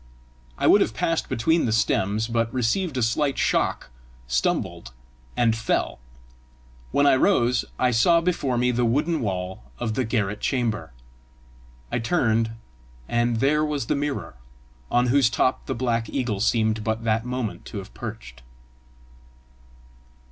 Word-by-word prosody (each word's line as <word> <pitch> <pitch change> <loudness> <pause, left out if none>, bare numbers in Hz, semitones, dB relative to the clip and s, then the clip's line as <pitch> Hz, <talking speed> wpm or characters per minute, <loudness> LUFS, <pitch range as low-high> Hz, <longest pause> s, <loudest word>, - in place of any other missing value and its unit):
I - - -1
would - - +6
have - - 0
passed - - -1
between 160 +9 +2
the 115 - 0
stems, 110 0 +1
but 115 -1 0
received 130 +6 0
a 125 - +1
slight 135 +5 0
shock, - - 0 0.3
stumbled, - - -1 0.4
and 115 -2 +3
fell. 115 - -1 0.9
When 140 - +2
I 140 -2 +6
rose, 125 -6 +2
I 125 -1 +2
saw 170 +9 +4
before 165 -7 0
me 125 +1 +2
the 125 0 0
wooden 150 +8 +1
wall 95 - -3 0.2
of 110 - -2
the 130 - 0
garret 105 -2 -1
chamber. 115 - -1 1.0
I - - 0
turned, 115 -4 +1 0.6
and 120 -1 0
there 150 +3 +3
was 150 -5 -2
the - - 0
mirror, 145 0 -3 0.6
on 120 0 +2
whose 135 -2 +4
top 125 +3 0
the - - -2
black 115 -2 -1
eagle 120 -7 -2
seemed 110 0 +1
but 110 +1 -2
that 115 0 +1
moment 125 -2 -4
to - - -7
have - - -8
perched. 65 0 -8
120 Hz, 145 wpm, -24 LUFS, 110-135 Hz, 1.0 s, would